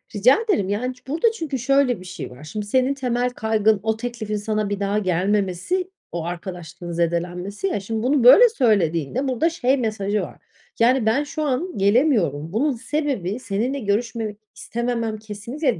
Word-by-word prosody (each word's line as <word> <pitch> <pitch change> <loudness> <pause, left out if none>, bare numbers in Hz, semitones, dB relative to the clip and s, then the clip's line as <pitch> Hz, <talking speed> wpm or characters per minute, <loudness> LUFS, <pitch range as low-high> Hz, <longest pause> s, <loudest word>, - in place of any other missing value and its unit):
Rica 250 - +5
ederim. 360 - 0
Yani 245 +6 -1
ç 250 +1 -25
burada 325 - +2
çünkü 315 - -4
şöyle 270 -2 +2
bir 185 - -12
şey 180 - -7
var. 125 +4 -12
Şimdi, 205 +7 -5
senin 260 +5 +2
temel 250 -2 -1
kaygın 220 -3 +1
o 220 0 0
teklifin 225 -3 -4
sana 215 0 -1
bir 205 -1 -2
daha 200 +1 0
gelmemesi, 195 - 0 0.2
o 170 -1 -3
arkadaşlığın 175 -1 -6
zedelenmesi, 175 - -2
ya, 370 - -1
şimdi 220 +3 -3
bunu 265 0 +2
böyle 445 - +9
söylediğinde 210 - +1
burada 260 +6 +1
şey 275 -5 +1
mesajı 215 -4 -1
var: - - -7 0.4
Yani, 245 +1 +4
"Ben 225 +7 +2
şu 300 +1 -4
an 300 +6 -2
gelemiyorum. 195 - +2
Bunun 280 +7 +2
sebebi 255 - -2
seninle 240 +4 -2
görüşmemek 220 -1 -2 0.2
istememem 230 -2 -2
kesinlikle 220 - -3
225 Hz, 165 wpm, -22 LUFS, 200-265 Hz, 0.4 s, böyle